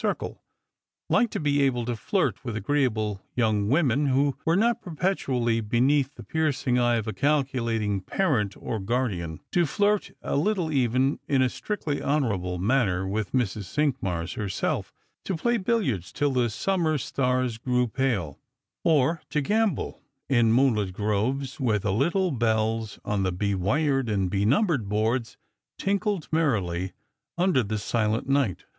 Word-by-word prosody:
circle; - - -3 0.7
liked 235 - +3
to - - -3
be 145 -1 +1
able 125 -4 +1
to 120 0 -2
flirt 110 - -1
with 115 - -4
agreeable 110 -4 0
young 110 -4 +1
womeu 140 +1 +2
who 140 +1 +2
were 165 - +3
not 235 +4 +2
perpetually 135 - 0
beneath 130 +6 +2
the - - -10
piercing 145 -5 0
eye 120 -1 +3
of 115 -1 -2
a 110 - -2
calculating 115 -6 0
parent 115 - 0
or 110 - -4
guardian, 95 -7 -2
to 175 - +3
flirt 205 +6 +1
a - - -2
little 170 +1 +1
even, 130 0 +1
in 135 -2 +3
a - - +3
strictly 155 - -3
honour 140 -6 +1
able 90 -1 -3
manner, 95 -3 +1
with 105 +1 -2
Mrs. 110 -5 -1
Cinqmars 95 - -1
herself; 100 -3 -2 0.3
to 190 - -2
play 240 +7 +1
billiards 185 - -1
till 145 -1 0
the 125 -2 +1
summer 160 - 0
stars 125 -3 -1
grew 125 +1 +1
pale, 110 - -1 0.4
or 155 0 +3
to 150 - 0
gamble 210 +5 0 0.3
in 120 -4 +3
moonlit 115 -6 +2
groves 110 +8 -1
where 115 -6 +2
the 100 -1 -1
little 175 - +1
bells 110 -3 0
on 105 -1 0
the 95 -1 +1
be 100 +3 -1
wired 135 - +1
and 95 -4 0
be 100 0 +1
numbered 135 - +2
boards 110 +3 0 0.4
tinkled 200 -3 -1
merrily 95 - 0 0.4
under 175 -6 +3
the 110 -1 -2
silent 110 +2 -1
night. 135 - +1
125 Hz, 150 wpm, -26 LUFS, 105-145 Hz, 0.7 s, liked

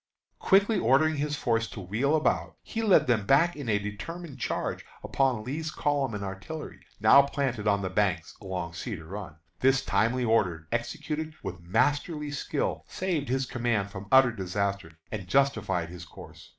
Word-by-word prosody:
Quickly 200 +2 +4
ordering 150 +5 +3
his 150 +1 -1
force 115 -4 0
to 105 - -9
wheel 110 - 0
about, 155 - 0
he 225 - -4
led 210 -4 +5
them 110 -5 +1
back 165 +6 +4
in 140 -5 -5
a 105 - +3
determined 135 +9 -6
charge - - -2 0.2
upon 130 -5 +1
Lee's 155 +6 -3
columns 145 -5 0
and 100 - -4
artillery, 100 +11 -7 0.2
now 140 - +8
planted 135 -6 -2
on 100 -1 +2
the 95 - -1
banks 95 -5 0
along 90 -3 -4
Cedar 90 -3 -6
Run. 95 -2 -7 0.2
This 135 +1 +3
timely 125 +3 +1
order, 90 -8 +1
executed 155 +6 -3
with 90 -2 -6
masterly 145 - 0
skill, 145 - -2
saved 170 -8 -2
his 130 +1 +1
command 115 -6 -1
from 100 +1 -8
utter 130 -2 +7
disaster, 100 -3 -3 0.2
and 100 -4 -5
justified 110 -11 +1
his 85 0 -9
course. 80 - -13
120 Hz, 165 wpm, -28 LUFS, 100-145 Hz, 0.2 s, now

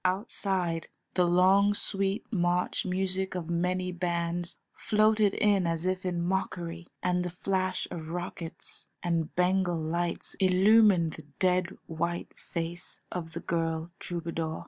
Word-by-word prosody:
Outside 185 -3 0 0.3
the 180 -1 +3
long 190 +3 +5
sweet 195 0 0
march 175 0 +1
music 190 +1 0
of 170 -2 -3
many 180 +2 0
bands 175 0 -2 0.2
floated 215 -1 +3
in 200 -4 +3
as 165 +1 -1
if 185 0 0
in 175 -1 -1
mockery, 175 -2 -2 0.2
and 180 0 +2
the 180 - -2
flash 185 +1 -1
of 160 -3 -6
rockets 175 -1 -5 0.2
and 165 -2 -1
Bengal 180 -1 +2
lights 170 +2 -1
illumined 190 -2 +5
the 155 - -11
dead, 185 -1 +1
white 170 +2 -3
face 170 0 -5
of 165 -3 -4
the 170 - -4
girl 165 0 -1
troubadour. 165 -2 -3
180 Hz, 130 wpm, -29 LUFS, 170-190 Hz, 0.3 s, long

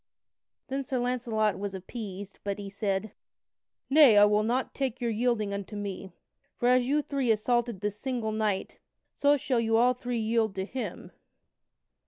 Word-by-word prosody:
Then 270 0 -2
Sir 260 0 -2
Launcelot 240 -4 0
was 200 -1 -4
appeased, 195 0 -7
but 200 0 -2
he 200 -1 -7
said: 200 0 -2 0.8
"Nay, 275 -6 +7
I 205 - +8
will 210 0 +3
not 240 +4 -1
take 265 -3 -2
your 235 -2 -1
yielding 220 -2 0
unto 200 +1 -5
me. 195 -2 -5 0.5
For 240 - +2
as 250 0 +4
you 295 +2 +2
three 275 -4 -1
assaulted 230 -1 +1
this 210 0 -3
single 245 -5 -2
knight, 215 -3 -2 0.4
so 285 +1 +4
shall 260 -2 0
you 225 -1 +2
all 245 +2 +4
three 245 -1 -4
yield 220 -2 0
to 190 0 -2
him." 255 +4 -6
225 Hz, 165 wpm, -28 LUFS, 205-250 Hz, 0.8 s, I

